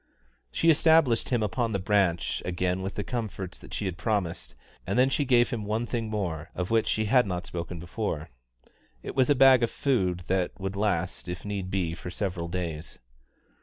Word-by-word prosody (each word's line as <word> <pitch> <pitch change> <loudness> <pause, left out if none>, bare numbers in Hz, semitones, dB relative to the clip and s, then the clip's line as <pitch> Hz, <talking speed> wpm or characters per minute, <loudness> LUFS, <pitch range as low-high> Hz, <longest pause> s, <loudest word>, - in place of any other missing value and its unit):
She 165 - +4
established 160 -6 +4
him 120 -4 +1
upon 110 +2 -1
the - - +2
branch 95 -3 +1
again 90 +1 -1
with 95 +1 -4
the 105 - -2
comforts 105 -7 -4
that - - -14
she 105 - -3
had 90 -3 -4
promised, 100 -7 -2 0.3
and - - 0
then 130 +2 +4
she 145 - +1
gave 120 -2 +4
him 115 -3 -2
one 110 +3 -1
thing 115 -2 -3
more, 85 -7 -3
of 90 +3 -3
which 115 -1 +3
she 110 - +1
had 125 +1 +4
not 90 -2 -3
spoken 85 0 -5
before. 85 - -4 0.7
It - - -5
was 130 -2 +3
a 145 - +5
bag 130 -1 +7
of 115 - +2
food 90 -10 0
that 95 0 -1
would 95 0 -3
last, 105 +1 -1
if 90 +2 -6
need 100 -3 -3
be, 90 -4 -1
for 90 +1 -7
several 90 -2 -3
days. 85 -3 -5
100 Hz, 195 wpm, -27 LUFS, 90-115 Hz, 0.7 s, bag